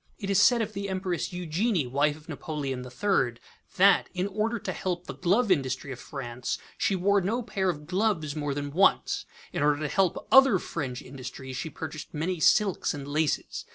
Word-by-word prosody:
It 200 -3 -3
is 200 0 +5
said 235 +1 +5
of 215 0 -6
the 200 0 -4
Empress 185 -2 -2
Eugenie, 180 - 0
wife 145 +4 +1
of 155 - -18
Napoleon 145 -4 -4
III, 125 - 0 0.4
that, 195 +1 +5
in 180 +1 0
order 215 +4 -1
to - - -4
help 180 -1 -3
the - - -6
glove 195 +5 +2
industry 135 -4 0
of 130 - -7
France, 125 -3 -4 0.2
she 195 - +1
wore 200 +2 +3
no 225 +7 -1
pair 195 -4 -1
of 150 -4 -4
gloves 180 -4 0
more 145 -2 -2
than 145 0 -3
once; 190 +6 +2 0.3
in - - -2
order 145 0 +3
to 150 - 0
help 185 +3 0
other 265 -6 +7
French 135 -8 -4
industries, 130 0 -8
she 130 +6 -4
purchased 155 -1 -7
many 170 +3 -1
silks 195 0 +3
and 140 -1 -7
laces. 150 +1 -1
165 Hz, 190 wpm, -27 LUFS, 145-195 Hz, 0.4 s, other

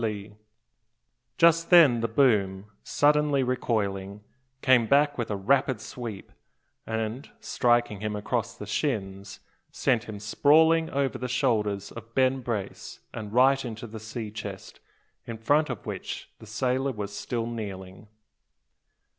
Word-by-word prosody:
Just 165 0 +4
then 155 -10 +7
the 115 - 0
boom, 105 -6 +2 0.2
suddenly 145 -1 +2
recoiling, 105 -5 -2 0.4
came 125 -3 +4
back 145 +2 +3
with 120 - -3
a 105 - -1
rapid 130 +4 +1
sweep; 110 -2 -8 0.6
and, 110 +4 -3
striking 120 -4 +1
him 105 0 -3
across 105 - -3
the - - -7
shins, 100 -7 -3 0.3
sent 120 -3 0
him 110 -2 -7
sprawling 160 +9 +4
over 140 -1 -1
the 125 - -3
shoulders 105 -6 0
of 115 0 -11
Ben 130 0 +3
Brace, 110 -5 -5
and 105 -2 -6
right 135 +3 +4
into 115 -2 -6
the 110 -1 -8
sea 110 0 -6
chest, 110 - -8 0.5
in 115 - -5
front 145 +7 +2
of 120 -7 -6
which - - -6
the 110 - -13
sailor 130 +4 -1
was 105 -3 -6
still 115 0 -3
kneeling. 100 -4 -7
115 Hz, 130 wpm, -27 LUFS, 105-135 Hz, 0.6 s, then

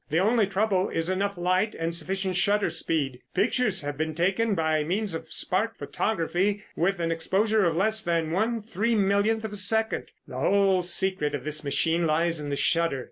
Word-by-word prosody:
The 155 - 0
only 215 +3 +3
trouble 195 -1 0
is 165 +2 -1
enough 200 +1 -1
light 185 +4 0
and 165 +1 -3
sufficient 190 +3 -3
shutter 200 +3 +2
speed. 140 -6 -1 0.2
Pictures 205 0 +1
have 145 0 -5
been 155 0 -2
taken 195 +6 +1
by 160 -2 +1
means 195 +4 -1
of 165 - -6
spark 215 +5 0
photography 200 +1 -1
with 185 +3 0
an 165 -1 -1
exposure 195 +6 +1
of 165 -2 +1
less 215 +5 +2
than 165 -4 -1
one 220 +5 0
three 225 +2 -1
millionth 205 +2 +1
of 220 - -4
a - - -6
second. 220 +3 +1 0.2
The - - -6
whole 195 -2 +3
secret 180 -3 0
of - - -6
this 155 0 -3
machine 165 +4 +1
lies 165 +1 +1
in 145 -1 -5
the 140 - -1
shutter. 165 -1 +1
185 Hz, 190 wpm, -26 LUFS, 165-210 Hz, 0.2 s, only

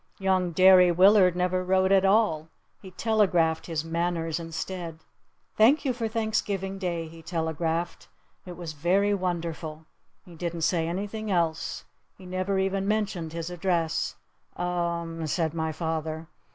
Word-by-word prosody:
Young 190 -2 +1
Derry 185 0 +7
Willard 185 0 +5
never 180 0 0
wrote 190 +1 +2
at 195 -1 +5
all. 195 -6 +2 0.3
He 190 - -10
telegraphed 180 -5 +1
his 160 -2 -2
"manners" 165 0 -1
instead. 165 0 -5 0.6
"Thank 260 +9 +5
you 260 - +1
for 235 -2 -2
Thanksgiving 210 -3 -2
Day," 170 -3 -2
he 165 +1 -12
telegraphed. 165 0 -2 0.4
"It 180 -2 -9
was 170 -3 -6
very 190 +7 +2
wonderful." 165 -4 -3 0.4
He 175 - -13
didn't 170 0 -4
say 165 -1 +1
anything 205 +5 -4
else. 170 -4 -1 0.3
He 190 - -13
never 185 +2 -1
even 195 +1 0
mentioned 195 -7 -1
his 165 +1 -4
address. 175 -2 -1 0.4
"U - - -3
m 170 -1 -2
m," 160 - -2
said 160 +1 0
my 160 -1 -2
father. 160 0 -3
175 Hz, 145 wpm, -27 LUFS, 165-190 Hz, 0.6 s, Derry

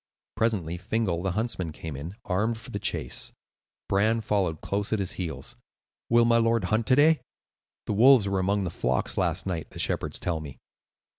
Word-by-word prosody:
Presently 95 -7 0
Fingal, 95 -2 -1
the 95 -1 -1
huntsman, 100 -6 -2
came 75 -1 -7
in, 80 +8 -7
armed 105 +4 0
for 110 - -9
the - - -3
chase. - - -1 0.6
Bran 110 +3 +2
followed 95 -7 0
close 100 0 -2
at 110 - +2
his 95 -3 -1
heels. 85 -8 -5 0.5
"Will 120 0 +5
my 115 0 +4
lord 115 -2 +2
hunt 110 +4 0
to 130 - +5
day? 155 +3 +5 0.6
The - - -1
wolves 120 0 +6
were 100 -1 0
among 100 +2 +1
the 90 - -3
flocks 65 -5 -1
last 90 -1 0
night, 85 -5 -3
the - - -12
shepherds - - 0
tell 85 -2 -2
me." 75 -4 -9
100 Hz, 180 wpm, -27 LUFS, 85-115 Hz, 0.6 s, wolves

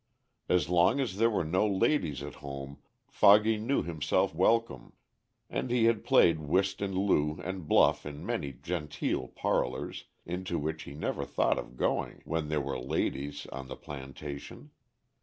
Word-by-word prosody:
As 90 -3 +3
long 90 +9 +3
as 115 -8 -2
there 115 +2 +4
were 105 -6 0
no 90 +7 +2
ladies 100 - +1
at - - -8
home 70 0 -7 0.3
"Foggy" 110 +2 +5
knew 115 +6 0
himself 80 -3 0
welcome, 95 - +1 0.5
and - - -3
he 120 -1 +2
had 115 -2 +2
played 85 -2 +5
whist 95 +7 0
and 95 -2 -2
loo 75 -6 +1
and 95 -3 -5
bluff - - +4
in 75 +3 -7
many 95 -12 -2
genteel 75 +3 -3
parlors, - - -2 0.2
into 90 0 -3
which 80 +1 -3
he 70 - -9
never 75 - -2
thought - - +1
of 60 - -9
going - - -1
when 80 -2 -2
there 75 -1 +1
were 70 0 -3
ladies 70 +1 -2
on 65 -1 -6
the 65 - -6
plantation. 70 +1 -8
80 Hz, 160 wpm, -30 LUFS, 70-100 Hz, 0.5 s, Foggy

